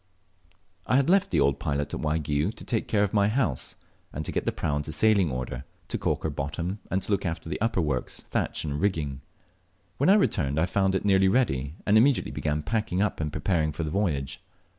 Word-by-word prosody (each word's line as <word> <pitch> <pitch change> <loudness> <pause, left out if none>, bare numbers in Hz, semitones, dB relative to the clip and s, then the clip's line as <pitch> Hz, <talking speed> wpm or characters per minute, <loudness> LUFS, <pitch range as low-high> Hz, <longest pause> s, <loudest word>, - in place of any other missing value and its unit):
I - - +3
HAD 140 +5 +3
left 195 0 +4
the - - +1
old 70 -1 +2
pilot 70 0 -2
at - - -3
Waigiou 75 +2 0
to - - -11
take 115 - -1
care 105 -2 +2
of 100 - -1
my 100 -1 +4
house 105 - -1 0.4
and 75 +2 -5
to - - -3
get - - -2
the - - +3
prau 75 -2 -2
into 75 +1 -4
sailing 100 +2 +3
order 65 -1 -4 0.3
to - - -1
caulk - - -1
her 80 - -1
bottom, 85 +8 -3
and 95 +1 0
to - - -5
look 100 - +1
after 85 -2 -4
the - - -4
upper 115 -4 +1
works, 70 -5 -1
thatch, - - -2
and 75 0 -3
ringing. 75 -9 -1 0.8
When 145 - +3
I 195 - +8
returned 70 - +1
I 85 - +3
found 95 +1 +1
it 95 - -1
nearly 95 -1 +4
ready, 75 - +1
and 105 +1 +5
immediately 130 +2 +3
began 75 0 -2
packing 110 -2 -1
up 105 0 0
and 75 -1 -2
preparing 80 -4 0
for 80 +2 -4
the 75 - -3
voyage. 75 -9 -1
85 Hz, 220 wpm, -27 LUFS, 75-105 Hz, 0.8 s, I